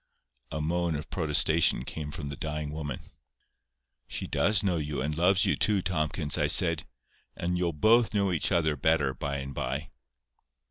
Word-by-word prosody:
A 75 Hz, -, -3 dB
moan 85 Hz, +1 st, -1 dB
of 75 Hz, -, -7 dB
protestation 80 Hz, -4 st, +2 dB
came 75 Hz, +1 st, -5 dB
from 75 Hz, -1 st, -6 dB
the 70 Hz, -, -6 dB
dying 75 Hz, 0 st, -4 dB
woman. 75 Hz, -4 st, -5 dB, 1.1 s
"She -, -, -5 dB
does 105 Hz, -2 st, +2 dB
know 90 Hz, -4 st, +1 dB
you, 75 Hz, -2 st, -3 dB
and 75 Hz, +3 st, -2 dB
loves 90 Hz, +3 st, +3 dB
you -, -, +2 dB
too, 100 Hz, -3 st, +2 dB
Tomkins," 75 Hz, -3 st, -1 dB
I -, -, +2 dB
said. -, -, +4 dB, 0.5 s
"And 90 Hz, +1 st, -2 dB
you'll 90 Hz, -1 st, 0 dB
both 110 Hz, +7 st, +3 dB
know 100 Hz, -2 st, +1 dB
each 85 Hz, +1 st, +1 dB
other 80 Hz, -4 st, +2 dB
better 75 Hz, -1 st, +1 dB
by 70 Hz, +2 st, -4 dB
and 70 Hz, 0 st, -6 dB
by." 65 Hz, +5 st, -4 dB
80 Hz, 170 wpm, -28 LUFS, 75-90 Hz, 1.1 s, said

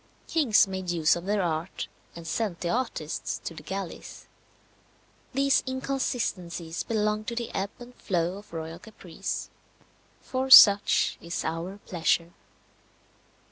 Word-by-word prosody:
Kings 280 Hz, -12 st, +3 dB
made 190 Hz, -1 st, -5 dB
use 165 Hz, -2 st, +3 dB
of 170 Hz, +1 st, -6 dB
their 205 Hz, -1 st, +1 dB
art, 165 Hz, +1 st, -3 dB, 0.3 s
and 170 Hz, -1 st, -9 dB
sent 185 Hz, -1 st, -2 dB
the 170 Hz, -, -1 dB
artists 200 Hz, -9 st, -2 dB
to -, -, -4 dB
the 160 Hz, -, -10 dB
galleys. 185 Hz, +3 st, -7 dB, 1.1 s
These 275 Hz, +1 st, +3 dB
inconsistencies 215 Hz, -11 st, -3 dB
belong 215 Hz, -1 st, -1 dB
to 235 Hz, -, -4 dB
the 235 Hz, -1 st, -4 dB
ebb 195 Hz, +1 st, -2 dB
and 245 Hz, 0 st, -12 dB
flow 180 Hz, -3 st, -2 dB
of 205 Hz, -, -17 dB
royal 165 Hz, 0 st, -6 dB
caprice. 185 Hz, -4 st, -6 dB, 0.7 s
"For 260 Hz, +1 st, -3 dB
such 205 Hz, -6 st, +8 dB
is 170 Hz, +1 st, -4 dB
our 170 Hz, +4 st, -4 dB
pleasure." 170 Hz, 0 st, 0 dB
190 Hz, 130 wpm, -27 LUFS, 170-230 Hz, 1.1 s, such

